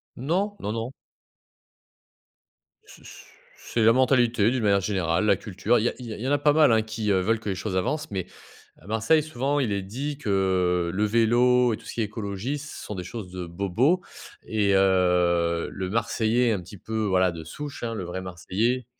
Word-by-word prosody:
Non, 185 - -1
non, 105 - -3
non. 115 +4 -4 1.9
Ce - - -16
ce - - -12 0.4
c'est 115 - -1
la 115 +1 +6
mentalité 120 -4 +3
d'une 130 -2 -1
manière 100 -2 +3
générale, 95 -1 0
la 100 -3 +4
culture, 100 +4 0
il - - -1
y - - +4
a - - -6
il 125 - -9
y 110 - -5
a - - -7
il - - -9
y 130 - -2
en - - 0
a - - +4
pas 150 - +3
mal, 150 -5 +5
hein, 110 - +4
qui, 110 -1 -2
heu, 95 -1 +3
veulent 110 +3 +1
que 110 - -10
les 95 - -1
choses 95 -1 -3
avancent, 150 +8 -2
mais 95 -3 -3 0.5
à 85 - -18
Marseille, 110 +9 +2
souvent, 145 -1 -1
il 120 -7 0
est 100 -1 -1
dit 135 +9 -4
que 95 -7 +1
le 105 +2 +1
vélo 120 +2 +3
et - - -3
tout - - -16
ce - - -8
qui 115 - -3
est - - +2
écologie, 105 +6 -4
ce 150 +1 -9
sont 105 - -6
des 90 - -5
choses 90 0 -7
de 90 -1 -5
bobo 100 - +1 0.5
et 105 -3 +1
heu, 90 -3 +2
le 95 -1 -4
Marseillais 115 +1 +1
un 100 - -1
petit 90 +3 -12
peu, 110 +4 -4
voilà, 95 -2 +2
de 85 - -8
souche, 145 - -8
hein, 115 -1 -2
le 95 - -4
vrai 90 +2 -5
Marseillais, 105 +7 -2
110 Hz, 220 wpm, -25 LUFS, 95-125 Hz, 1.9 s, la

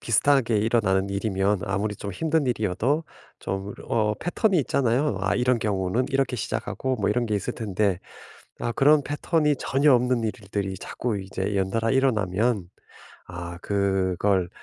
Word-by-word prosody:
비슷하게 120 0 +3
일어나는 105 -3 +1
일이면 100 -1 0
아무리 100 +2 -1
좀 100 -1 -6
힘든 160 - 0
일이어도 120 - 0 0.3
좀 95 +1 -4 0.2
어 105 -2 +1
패턴이 180 - +1
있잖아요. 130 -2 +1
'아 95 - +1
이런 125 0 +2
경우는 105 +3 0
이렇게 135 -2 0
시작하고.' 130 +4 -2
뭐 100 - 0
이런 120 +3 +1
게 110 - -1
있을 100 - -2
텐데. 100 -3 0 0.6
아 120 - -1
그런 145 +4 +5
패턴이 150 +1 +1
전혀 140 +3 +3
없는 125 -1 +2
일들이 100 -3 -3
자꾸 115 0 -3
이제 95 +1 -3
연달아 105 +5 0
일어나면 110 -6 +1 0.6
아 85 0 -7
그걸 95 -1 +1
110 Hz, 320 characters per minute, -25 LUFS, 95-125 Hz, 0.6 s, 그런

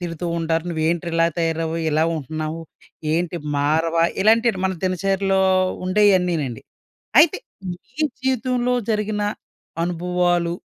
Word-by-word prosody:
తిడుతూ 175 0 -4
ఉంటారు. 165 0 0
"నువ్వు 160 -1 -2
ఏంటి 170 +1 -1
ఇలా 165 0 +3
తయారవ్వవు, 165 0 -1
ఇలా 155 +1 +2
ఉంటున్నావు, 155 +2 -4 0.5
ఏంటి 175 +1 -1 0.2
మారవా," 160 +3 +2 0.2
ఇలాంటివన్ని 225 -2 +3
మన 190 0 +1
దినచర్యలో 195 +1 +1 0.5
ఉండేవన్నీనండి. 180 - +2 0.6
అయితే 315 - +3 0.3
మీ 235 - -8 0.2
జీవితంలో 250 -1 0 0.2
జరిగిన 210 -1 -1 0.6
అనుభవాలు, 175 0 0
175 Hz, 105 wpm, -21 LUFS, 165-195 Hz, 0.6 s, ఇలా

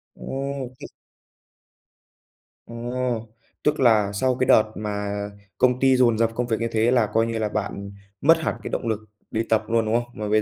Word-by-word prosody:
Ừm, 135 -1 -4
chứ - - -8 1.8
À, - - -11 0.9
tức 150 - +1
là 110 -6 +4
sau 130 +5 +1
cái 130 - 0
đợt 110 - +7
mà 105 -1 -3 0.5
công 125 +2 +3
ty 135 0 +4
dồn 120 -3 +4
dập 115 0 +2
công 125 +1 -1
việc 115 -1 0
như 115 - 0
thế 115 +2 +2
là, 120 -3 +4
coi 115 0 +3
như 115 -1 -2
là, 110 -1 0
bạn 100 -1 -4 0.3
mất 165 +3 +6
hẳn 160 - -2
cái - - -4
động - - -3
lực 110 -1 0 0.3
đi 110 +1 0
tập 110 -1 +3
luôn, 115 0 +2
đúng 110 +1 +1
không? 120 0 0
Mà 105 0 -4
bây 110 +1 +4
115 Hz, 195 wpm, -24 LUFS, 110-125 Hz, 1.8 s, đợt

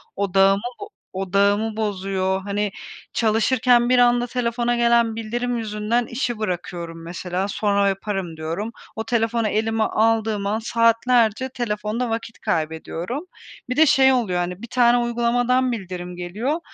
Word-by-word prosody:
Odağımı 195 0 +3 0.2
bo 410 +1 -8 0.2
odağımı 200 +3 +1
bozuyor. 190 -2 -1
Hani, 205 +1 -2 0.4
çalışırken 240 +2 +3
bir 255 - +4
anda 245 0 +4
telefona 240 0 -1
gelen 235 -1 +3
bildirim 240 +2 -2
yüzünden 220 +2 -1
işi 240 -1 -3
bırakıyorum 175 -4 -4
mesela. 180 +2 -3
Sonra 200 -1 +1
yaparım 195 -4 -3
diyorum. 165 +8 -4 0.2
O 220 - -3
telefonu 225 0 0
elime 220 +1 0
aldığım 220 -2 +1
an 210 +2 0
saatlerce 230 +1 +2
telefonda 230 0 -2
vakit 225 0 -4
kaybediyorum. 165 - -3 0.4
Bir 255 - -1
de 315 - +7
şey 265 -2 +5
oluyor, 205 -8 0
hani, 180 +2 -3
bir 235 - -7
tane 245 0 +4
uygulamadan 245 +2 +1
bildirim 180 -5 -6
geliyor 210 - -2
220 Hz, 135 wpm, -22 LUFS, 195-240 Hz, 0.4 s, de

